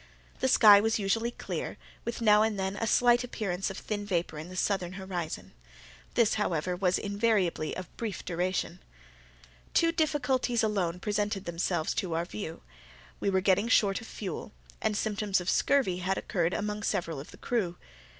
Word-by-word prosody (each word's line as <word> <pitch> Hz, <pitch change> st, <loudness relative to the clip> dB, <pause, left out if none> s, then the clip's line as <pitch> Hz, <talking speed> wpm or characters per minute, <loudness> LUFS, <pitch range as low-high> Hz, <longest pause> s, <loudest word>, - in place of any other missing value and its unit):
The 260 Hz, -, +1 dB
sky 210 Hz, -5 st, +8 dB
was 225 Hz, +1 st, +1 dB
usually 225 Hz, +3 st, 0 dB
clear, 240 Hz, -, -5 dB, 0.3 s
with 235 Hz, 0 st, -4 dB
now 210 Hz, -2 st, +6 dB
and 215 Hz, -2 st, +1 dB
then 190 Hz, +1 st, -1 dB
a 225 Hz, -, -2 dB
slight 240 Hz, +2 st, +4 dB
appearance 195 Hz, -6 st, -2 dB
of 195 Hz, -, -7 dB
thin 205 Hz, -1 st, -3 dB
vapour 175 Hz, -6 st, -2 dB
in 160 Hz, +3 st, -8 dB
the 185 Hz, -, -9 dB
southern 185 Hz, -2 st, 0 dB
horizon—this, 160 Hz, -, -3 dB
however, 180 Hz, -4 st, 0 dB
was 180 Hz, 0 st, +2 dB
invariably 200 Hz, -6 st, 0 dB
of 185 Hz, -2 st, -8 dB
brief 220 Hz, -4 st, -4 dB
duration. 180 Hz, +1 st, -2 dB, 1.0 s
Two 330 Hz, 0 st, +4 dB
difficulties 265 Hz, -7 st, +1 dB
alone 185 Hz, -5 st, 0 dB
presented 205 Hz, -1 st, -1 dB
themselves 170 Hz, -1 st, -1 dB
to 175 Hz, -4 st, -2 dB
our 170 Hz, +1 st, 0 dB
view; 175 Hz, -3 st, -7 dB, 0.6 s
we -, -, 0 dB
were 190 Hz, -1 st, +2 dB
getting 195 Hz, +3 st, +3 dB
short 200 Hz, -5 st, +3 dB
of 225 Hz, -, -10 dB
fuel, 190 Hz, -7 st, -6 dB, 0.3 s
and 210 Hz, -, 0 dB
symptoms 205 Hz, -2 st, 0 dB
of 180 Hz, 0 st, -1 dB
scurvy 260 Hz, -11 st, +2 dB
had 190 Hz, +1 st, -1 dB
occurred 175 Hz, -3 st, 0 dB
among 210 Hz, 0 st, -2 dB
several 170 Hz, -7 st, -1 dB
of 140 Hz, -, -9 dB
the -, -, -13 dB
crew. 195 Hz, -8 st, -1 dB
195 Hz, 165 wpm, -29 LUFS, 180-220 Hz, 1.0 s, sky